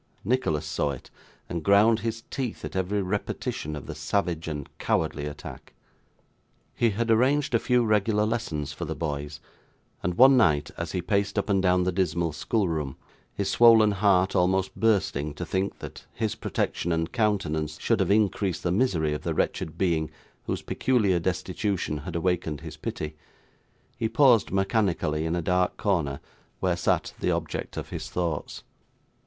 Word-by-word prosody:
Nicholas 80 - 0
saw 75 0 -1
it, 65 -3 -7 0.4
and 85 - -3
ground 105 +3 +5
his 115 +1 -3
teeth 130 -5 -4
at - - -7
every 95 +2 0
repetition 90 -5 -3
of 75 - -7
the 80 - -6
savage 85 +2 -1
and 75 -3 -4
cowardly 75 -2 0
attack. 75 0 -9 1.0
He 120 - +2
had 115 +2 0
arranged 130 +5 +3
a 115 - +4
few 125 0 +2
regular 105 0 +2
lessons 75 -11 -2
for 85 - -6
the 80 +1 -4
boys; 75 -1 -4 0.6
and 90 0 -1
one 130 +2 +8
night, 75 - +3
as - - -5
he 90 - -2
paced 100 0 0
up 100 0 0
and 95 -1 +3
down 90 -1 +3
the 95 - +1
dismal 85 -2 0
schoolroom, 80 - -1 0.4
his 100 -1 -1
swollen 115 -3 +7
heart 95 -2 +2
almost 95 +1 +1
bursting 80 -10 +1
to 90 - -5
think 95 +3 -2
that - - -10
his 110 -2 -1
protection 85 - -2
and 80 0 -1
countenance 85 -10 0
should - - +1
have - - +1
increased 100 -3 +1
the 85 - 0
misery 85 -8 +1
of 75 - -4
the - - -2
wretched 80 - -1
being 80 -5 +1 0.4
whose - - -2
peculiar 105 -9 +1
destitution 90 -1 -2
had 80 +4 -7
awakened 85 -3 -1
his - - -8
pity, 75 0 -5 0.8
he 110 - -1
paused 120 -2 +5
mechanically 95 -6 0
in 80 - 0
a 85 - -2
dark 90 +1 +1
corner 80 -9 0 0.4
where 90 -2 +1
sat 85 - 0
the - - 0
object - - -3
of - - -5
his - - -6
thoughts. 85 -4 -3
90 Hz, 165 wpm, -26 LUFS, 80-105 Hz, 1.0 s, one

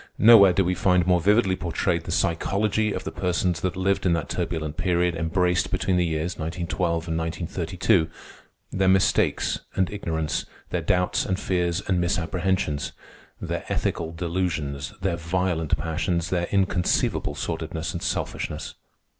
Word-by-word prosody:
Nowhere 105 -4 +8
do 95 +1 +2
we 90 - +1
find 90 -1 +2
more 90 -1 +3
vividly 100 0 +3
portrayed 85 -3 -1
the - - -4
psychology 100 +5 +1
of - - -4
the - - -4
persons 90 -1 -1
that 90 -2 -1
lived 95 +1 0
in 90 - +3
that 80 -4 -2
turbulent 80 -3 -3
period 90 0 +1
embraced 90 +2 +1
between 95 - 0
the 90 -1 +3
years 80 +2 -2
1912 85 +1 -2
and 80 0 -1
1932—their 85 +2 -2
mistakes 95 0 +2 0.2
and 95 -2 +1
ignorance, 80 -7 -2 0.2
their - - 0
doubts 90 0 +1
and 95 0 -2
fears 90 0 0
and 90 -2 +2
misapprehensions, 85 -3 -1 0.5
their - - -3
ethical 80 -1 -1
delusions, 80 -5 -2
their 90 -3 0
violent 85 -1 0
passions, 85 +1 -1
their 85 -2 0
inconceivable 95 -2 +1
sordidness 80 +1 -4
and 85 - -4
selfishness. - - -3
90 Hz, 140 wpm, -25 LUFS, 80-95 Hz, 0.5 s, Nowhere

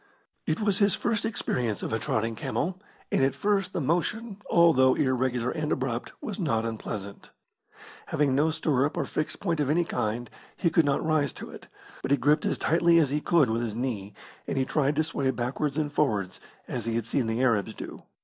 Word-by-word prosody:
It 155 - 0
was 205 -3 +1
his 200 -1 +4
first 225 -2 -1
experience 125 - -2
of - - -3
a 110 - +1
trotting 115 0 -1
camel, 180 +10 -2 0.3
and - - +2
at 135 - +2
first 200 -3 +1
the - - -2
motion, 195 - -1
although 155 -7 +5
irregular 125 -2 +1
and 155 -2 -2
abrupt, 130 -2 -2
was 210 -1 -5
not 115 - 0
unpleasant. 105 -3 -6 0.8
Having 145 -3 +1
no 150 +4 +3
stirrup 145 -3 0
or - - 0
fixed 155 - -3
point 170 -5 -1
of 145 -2 +1
any 170 +3 +2
kind, 120 -3 -2 0.3
he 170 - +1
could 165 0 +4
not 140 +2 +1
rise 155 -3 +1
to - - -9
it, - - -11 0.3
but - - -3
he 140 - +4
gripped 150 +2 +2
as - - 0
tightly 170 +1 +4
as 150 -5 +3
be 150 +1 0
could 150 -9 +3
with 115 +1 0
his 115 -3 -3
knee, 110 -5 -3 0.3
and - - -2
he 130 - +2
tried 145 +1 +1
to 155 - +2
sway 140 -4 -1
backwards 130 +3 -2
and 150 -2 -1
forwards 105 -11 0 0.3
as 120 -3 -4
he 115 -1 -1
had 115 -2 -1
seen 115 +1 0
the 115 +3 0
Arabs 110 -6 +1
do. - - -8
140 Hz, 205 wpm, -27 LUFS, 120-165 Hz, 0.8 s, although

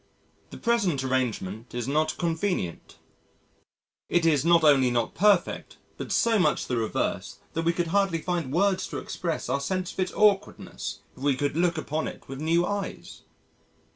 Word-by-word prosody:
The - - -9
present 200 - +1
arrangement 120 -4 -2
is 120 0 -3
not 155 +3 0
convenient... 165 - -2 1.1
it 175 -1 +2
is 150 -4 +3
not 170 0 +5
only 135 -4 +5
not 120 -1 0
perfect 205 +2 +2 0.2
but - - -6
so 230 -2 +3
much 180 - +2
the 125 - -2
reverse 115 -2 -2 0.2
that 165 0 -2
we 170 - +4
could 170 -1 -2
hardly 195 -4 +2
find 170 -5 -2
words 190 +4 +1
to - - -5
express 165 -3 -3
our 140 - 0
sense 185 +5 -2
of - - -12
its 185 - -1
awkwardness 205 -1 0
if - - -15
we 140 -1 +2
could 145 +1 -1
look 170 0 +1
upon 155 0 -2
it - - -9
with 135 +1 -7
new 165 +2 +2
eyes...." 200 -1 -5
165 Hz, 170 wpm, -26 LUFS, 135-185 Hz, 1.1 s, not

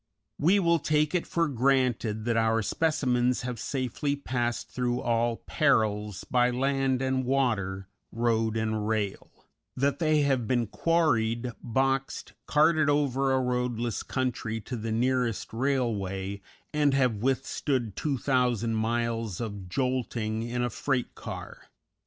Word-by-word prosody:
We 180 +7 +4
will 170 -3 +3
take 150 +1 +1
it 180 - 0
for 170 -1 +1
granted 125 -5 +1
that 120 -1 +1
our 115 0 +2
specimens 125 -5 +1
have 125 -2 -4
safely 135 +3 -2
passed 120 -4 -2
through 125 -1 -1
all 120 -1 0
perils 105 - +1
by 125 -1 +2
land 135 +1 0
and 130 0 0
water, 110 -8 0 0.2
road 115 -1 +1
and 110 -1 -1
rail; 110 -3 -2 0.5
that 140 +2 +1
they 155 -2 +3
have 135 -5 +1
been 120 -2 +1
quarried, 120 -4 +1
boxed, 135 +2 -1
carted 155 0 +4
over 135 -2 +2
a 130 - +3
roadless 125 -2 -1
country 125 -4 -2
to 125 - -6
the 115 -1 -4
nearest 120 -3 0
railway, 100 -7 -1 0.3
and 145 -2 +3
have 125 -5 +2
withstood 130 -1 -1
2,000 125 -5 0
miles 115 -2 -1
of 100 -5 -5
jolting 120 -2 -1
in 120 +1 -2
a 120 - -1
freight 125 +2 -1
car. - - -8
125 Hz, 130 wpm, -28 LUFS, 115-135 Hz, 0.5 s, We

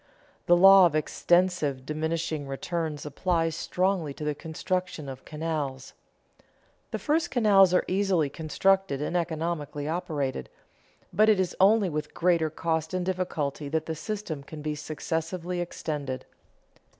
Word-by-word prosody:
The 175 - +6
law 195 0 +9
of 155 - -4
extensive 155 -3 +1
diminishing 155 0 -2
returns 150 +2 -3
applies 165 +2 0
strongly 180 -7 -1
to - - -7
the 150 0 0
construction 160 0 -3
of 130 -1 -8
canals. 150 -4 -4 1.0
The - - -3
first 320 +3 0
canals 200 -6 +5
are 180 - +2
easily 185 -5 +1
constructed 170 +2 +1
and 150 +4 -3
economically 160 -3 -2
operated, 155 - -2 0.6
but 215 +1 +5
it 210 -3 +4
is 185 -2 -1
only 205 +1 +5
with 150 -2 -4
greater 170 -2 +2
cost 160 +1 -2
and 180 -1 -1
difficulty 155 -6 -2
that 160 +1 -1
the 160 - -3
system 180 -3 -5
can 150 +2 -10
be 150 0 -1
successively 165 +4 -3
extended. 145 -6 -4
165 Hz, 135 wpm, -27 LUFS, 150-185 Hz, 1.0 s, law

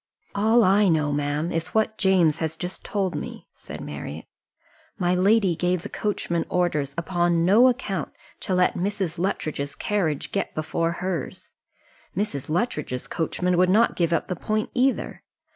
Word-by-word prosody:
"All 220 +3 +4
I 200 +2 +4
know, 155 -4 +2
ma'am, 145 +3 -1
is 165 +4 -3
what 220 0 +1
James 180 -5 +3
has 160 -1 -2
just 180 +2 -5
told 195 -3 -1
me," - - -6
said - - -9
Marriott. - - -7 0.7
"My 180 -2 +1
lady 190 0 +3
gave 180 +1 0
the - - -6
coachman 170 -5 -1
orders 150 -6 0
upon 170 -1 +1
no 215 +8 +6
account 210 - -1 0.3
to 185 - -1
let 180 0 +3
Mrs. 190 -3 -2
Luttridge's 155 -6 -2
carriage 175 -9 -1
get 195 - -2
before 165 +2 -1
hers. 175 -3 -4 0.7
Mrs. 150 -11 -2
Luttridge's 155 - -1
coachman 180 +2 -1
would 180 0 +4
not 220 +5 +4
give 170 -2 +1
up 165 - 0
the 180 - -2
point 215 +5 -2
either. 260 +1 0
180 Hz, 155 wpm, -24 LUFS, 160-200 Hz, 0.7 s, no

